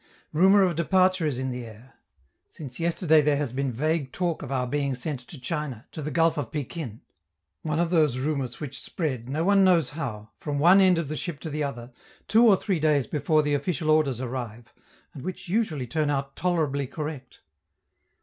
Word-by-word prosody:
Rumor 190 +5 +6
of 180 -3 +1
departure 185 +1 +2
is 140 -5 -2
in 130 0 -2
the 125 0 -5
air. 115 +3 -13 0.5
Since 135 -5 -10
yesterday 165 -2 +3
there 145 -1 +2
has 140 -4 -2
been 135 0 -1
vague 150 +2 -1
talk 175 -3 -2
of 140 - -7
our 130 -2 0
being 140 +1 -1
sent 135 +2 -4
to 155 - -10
China, 135 -3 -4
to 155 - -7
the 150 - -3
Gulf 165 +1 +2
of 130 -6 -4
Pekin; 145 -5 -5 0.6
one 155 -1 -2
of 170 0 +1
those 155 -7 +3
rumors 130 -3 -2
which 140 -3 -6
spread, 130 -8 -3
no 155 +4 -1
one 195 +1 +4
knows 175 -7 +4
how, 110 -9 -6
from 145 -2 -3
one 175 +7 +6
end 185 -2 +5
of 165 -3 -1
the 155 - -4
ship 160 -2 -5
to 160 - -5
the 150 +1 -2
other, 125 -3 -5 0.4
two 230 +3 +5
or 200 -3 +6
three 190 -4 -1
days 150 -4 +2
before 155 +1 +1
the 145 0 0
official 155 +1 0
orders 145 -6 +2
arrive, 120 -3 -6 0.4
and 135 - -9
which 185 +2 -6
usually 175 - 0
turn 150 +4 -1
out 140 -1 -2
tolerably 155 -6 0
correct. 145 -2 -7
150 Hz, 200 wpm, -26 LUFS, 130-165 Hz, 0.6 s, Rumor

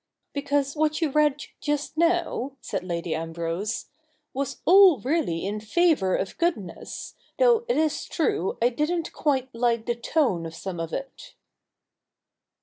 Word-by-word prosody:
'Because 285 0 0
what 310 0 +1
you 320 -4 0
read 295 0 +2 0.2
just 295 0 -2
now,' 335 -5 +1
said - - -4
Lady 170 -2 -3
Ambrose, 165 +6 -3 0.2
' 305 -1 -45
was 275 0 -3
all 370 -2 +8
really 250 - -1
in 205 +2 -2
favour 220 - +2
of 190 - -3
goodness, 260 - -3 0.2
though 475 -2 +4
it 485 - +1
is 310 -1 +1
true 195 - -1
I 240 - +5
didn't 315 +6 -1
quite 265 -4 0
like 230 -1 +1
the 240 - +1
tone 235 - 0
of 165 - -10
some 180 0 -5
of 165 0 -4
it.' 275 0 -7
275 Hz, 145 wpm, -25 LUFS, 195-315 Hz, 0.2 s, all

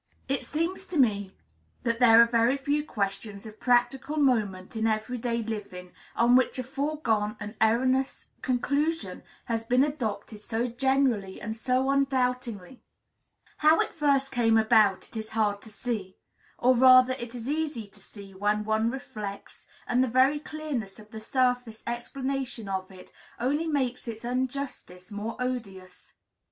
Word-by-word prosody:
It 275 +1 -1
seems 340 +5 -3
to 350 - -4
me 205 -7 +2 0.5
that 230 -1 0
there 235 -1 +7
are 235 +4 +3
few 285 +2 0
questions 200 -4 -4
of 215 0 -11
practical 255 +4 +1
moment 215 -9 +1
in 220 0 +1
every 220 +3 -1
day 235 0 -1
living 200 -5 -6 0.2
on 240 +1 +4
which 260 +1 +3
a 255 - -2
foregone 260 -6 -1
and 210 0 -6
erroneous 255 +4 +1
conclusion 285 +6 -1 0.2
has 230 -2 -2
been 250 +3 +3
adopted 230 -7 -3
so 230 +2 -2
generally 240 -5 0
and 220 +1 -5
so 255 +3 0
undoubtingly. 250 -5 -1 0.8
How 310 +2 +5
it - - 0
first 280 -3 +1
came 225 -3 +3
about 220 -3 +4
it - - -16
is 220 0 -5
hard 205 -2 +1
to 220 - -12
see. 210 -3 -4 0.4
Or, 255 +1 +4
rather, 255 +1 +7
it 240 -1 -7
is 235 0 -6
easy 295 -6 -2
to - - -20
see, 200 -2 -13
when 205 +2 0
one 220 +1 +1
reflects; 215 -6 -7 0.2
and 250 +1 +2
the - - +1
very 260 +5 +3
clearness 290 -10 -5
of 215 0 -15
the 220 - -7
surface 245 -2 0
explanation 260 -1 -3
of 190 -1 -3
it 185 -1 -14 0.3
only 290 +7 0
makes 260 -5 -1
its 225 0 -6
injustice 250 -7 -4
more 210 +3 -5
odious. 200 -8 -5
240 Hz, 150 wpm, -27 LUFS, 215-265 Hz, 0.8 s, there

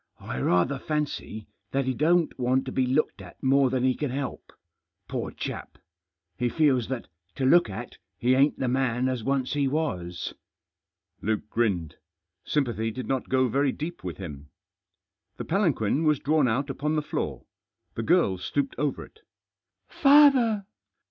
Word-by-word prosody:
" - - -35
I 60 - -5
rather 125 - +2
fancy 150 -8 -3 0.2
that 135 0 0
he 130 - 0
don't 165 +3 +2
want 130 +2 +1
to 130 - -4
be 130 -1 +1
looked 135 +5 0
at - - -13
more 135 0 +4
than 130 0 0
he 130 0 +3
can 145 +2 -3
help. 135 0 -5 0.6
Poor - - -3
chap! - - -6 0.6
he 125 - +1
feels 135 -5 +2
that, 130 -2 -4 0.3
to 135 - -1
look 170 -1 +5
at, 95 - -7 0.2
he 125 +2 +2
ain't 140 +3 +3
the 130 - -1
man 125 -1 +1
as 130 -3 -2
once 135 0 0
he 145 -2 +1
was." 90 - -2 0.9
Luke 105 0 -1
grinned. 90 -9 0 0.5
Sympathy 120 -7 0
did 125 +3 -6
not 130 -2 -2
go 130 0 +3
very 135 +3 +1
deep 165 +6 -6
with 90 -3 -5
him. 75 -6 -8 0.9
The - - -5
palanquin 160 - +1
was 150 -2 +3
drawn 150 0 +2
out 135 +5 0
upon 150 +3 -1
the 150 - 0
floor. - - -4 0.5
The - - -3
girl 115 - +2
stooped 140 +8 -1
over 145 -1 -1
it. 440 - -22 0.7
"Father!" 275 -8 +5
130 Hz, 160 wpm, -26 LUFS, 120-150 Hz, 0.9 s, look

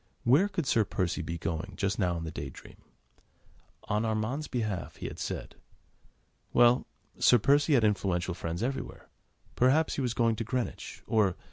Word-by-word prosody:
Where 140 +12 +5
could 190 -6 -3
Sir 115 -3 +3
Percy 90 -2 -2
be 85 +1 -4
going 85 +4 -4
just 100 +2 -1
now 90 -3 +1
in 80 - -5
the 80 - -5
Day - - -5
Dream? - - -14 1.1
On 105 0 -1
Armand's 115 +7 -1
behalf, 110 -8 -3
he - - -8
had - - -8
said. - - -4 1.0
Well! 120 +1 +5 0.3
Sir 125 - +6
Percy 145 +6 +3
had 120 - +3
influential 90 -4 +1
friends 85 +3 -4
everywhere. 135 +2 -4 0.5
Perhaps 140 +6 +3
he - - 0
was 125 -3 -1
going 115 -2 +2
to 115 - -2
Greenwich, 125 +1 -4
or.. 105 -5 +2
110 Hz, 165 wpm, -29 LUFS, 90-125 Hz, 1.1 s, Sir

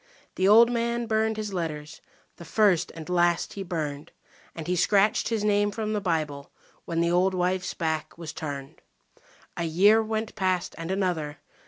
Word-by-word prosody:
The 185 - +1
old 230 +4 +7
man 235 0 -1
burned 220 -1 0
his 210 -2 -4
letters, 155 -3 -5 0.4
the - - -10
first 180 0 +2
and 160 -2 -8
last 175 -1 +1
he 200 - -6
burned, 155 -4 -4 0.4
And 160 - -6
he 180 - 0
scratched 200 +4 +3
his 225 -2 -1
name 205 0 +2
from 215 +1 -3
the 210 - -1
Bible 155 -6 -2 0.4
when 165 0 -1
the 170 0 +1
old 185 +2 +2
wife's 185 +1 -1
back 160 -3 -3
was 165 -2 -7
turned. 140 -3 -7 0.7
A 170 - -2
year 200 +7 +5
went 220 0 -3
past 185 -2 -1
and 165 +1 -6
another. 180 -6 -1
180 Hz, 170 wpm, -26 LUFS, 165-210 Hz, 0.7 s, old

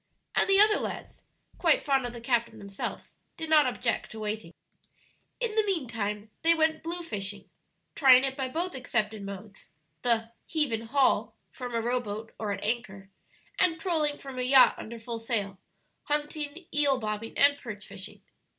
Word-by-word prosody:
And - - +2
the 390 0 +6
other 425 0 +7
lads, - - -6 0.3
quite 330 -4 +4
fond 270 -3 +2
of 240 - -8
the 235 - -8
captain 235 -1 0
themselves, 200 -1 -6 0.2
did 320 -1 -5
not 300 -3 +7
object 245 -1 -1
to 220 - -8
waiting. 215 -4 -4 0.9
In 475 -3 -1
the 435 - +4
mean 365 -10 -1
time 210 -2 -3
they 335 0 +5
went 315 0 +2
blue 345 +2 -3
fishing 205 -8 -4 0.5
(trying 260 -3 +7
it 265 -1 -1
by 265 -1 -2
both 335 +7 -2
accepted 220 -5 -1
modes 200 +1 -9 0.3
the 230 -2 +1 0.2
"heave 300 -5 +1
and 225 0 -2
haul" 270 +3 +2 0.2
from 245 -2 -6
a 230 - +1
rowboat 225 -2 -2
or 215 -2 -2
at 200 - -4
anchor, 195 -4 -3 0.5
and 335 -2 +3
trolling 315 -4 0
from 270 -2 -8
a - - 0
yacht 260 +1 +7
under 235 +1 -7
full 230 0 -5
sail), 205 -4 -2 0.5
hunting, 295 +2 -2
eel 285 -2 +3
bobbing, 215 -1 -4
and 285 0 +5
perch 210 -5 -8
fishing. 195 0 -8
245 Hz, 170 wpm, -28 LUFS, 215-295 Hz, 0.9 s, other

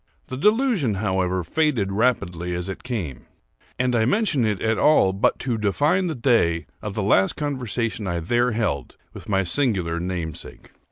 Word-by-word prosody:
The 130 - -4
delusion, 210 - +2
however, 95 -2 0
faded 120 - 0
rapidly 90 -6 0
as 90 +2 -3
it 95 - -6
came; 90 - -5 0.5
and 125 -1 +1
I 110 - +3
mention 145 - +1
it 105 -3 -1
at 110 -1 0
all 125 -11 +4
but 95 - +1
to 120 -4 -2
define 145 - +1
the 160 - -3
day 110 - +2 0.2
of 105 -1 -5
the 105 - -1
last 95 -1 +3
conversation 120 -7 -3
I 85 -1 -1
there 120 +8 +1
held 70 - -2 0.2
with - - -11
my 95 -1 +2
singular 90 -6 0
namesake. 85 -3 -6
105 Hz, 165 wpm, -23 LUFS, 90-130 Hz, 0.5 s, all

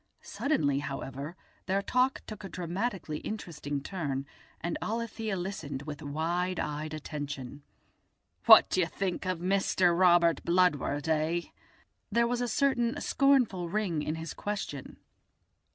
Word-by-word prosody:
Suddenly, 145 - 0
however, 140 +2 -5 0.3
their 195 +1 +1
talk 255 +4 +1
took 215 -1 -8
a 195 - -6
dramatically 180 -2 -3
interesting 150 -9 -5
turn, 145 -8 -3 0.3
and 170 0 -2
Alethia 225 -2 -2
listened 165 -7 -4
with 150 0 -7
wide 170 +5 -1
eyed 150 +1 -3
attention. 145 -3 -6 0.9
"What - - +10
do - - +2
you 175 - +3
think 185 0 -3
of 185 -2 -1
Mister 185 -1 +2
Robert 170 -3 +4
Bludward, 165 -4 +2
eh?" 160 +2 +1 0.7
There 235 +3 +3
was 245 +1 0
a 245 - 0
certain 245 -2 +1
scornful 250 -11 +2
ring 185 -5 0
in 155 +1 -2
his 160 0 -5
question. 195 -9 -5
175 Hz, 130 wpm, -30 LUFS, 150-200 Hz, 0.9 s, What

